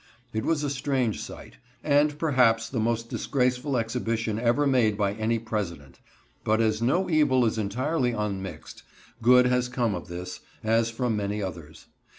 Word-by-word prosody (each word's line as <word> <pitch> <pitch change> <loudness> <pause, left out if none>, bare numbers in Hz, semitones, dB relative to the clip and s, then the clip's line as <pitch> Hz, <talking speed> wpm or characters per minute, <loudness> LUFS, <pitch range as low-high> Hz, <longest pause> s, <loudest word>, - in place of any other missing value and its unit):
It 110 0 -1
was 155 -3 +1
a 145 - 0
strange 130 -4 -1
sight, - - -10 0.3
and 145 0 +3
perhaps 125 -8 +3
the 125 - -3
most 115 +1 0
disgraceful 125 +2 0
exhibition 115 -2 -1
ever 120 +5 +2
made 120 -7 +3
by 100 -1 +1
any 110 +2 0
President; 100 - -5 0.4
but, 110 +1 +2
as 110 -1 +1
no 155 +11 +2
evil 145 -6 +3
is 110 0 0
entirely 125 +6 0
unmixed, 100 -4 -5 0.4
good 125 +2 +6
has 125 0 +1
come 120 -4 0
of 90 -2 -6
this, 90 +1 -6 0.2
as 115 +1 +2
from 115 0 -1
many 105 0 -2
others. 80 -4 -8
115 Hz, 160 wpm, -26 LUFS, 110-130 Hz, 0.4 s, good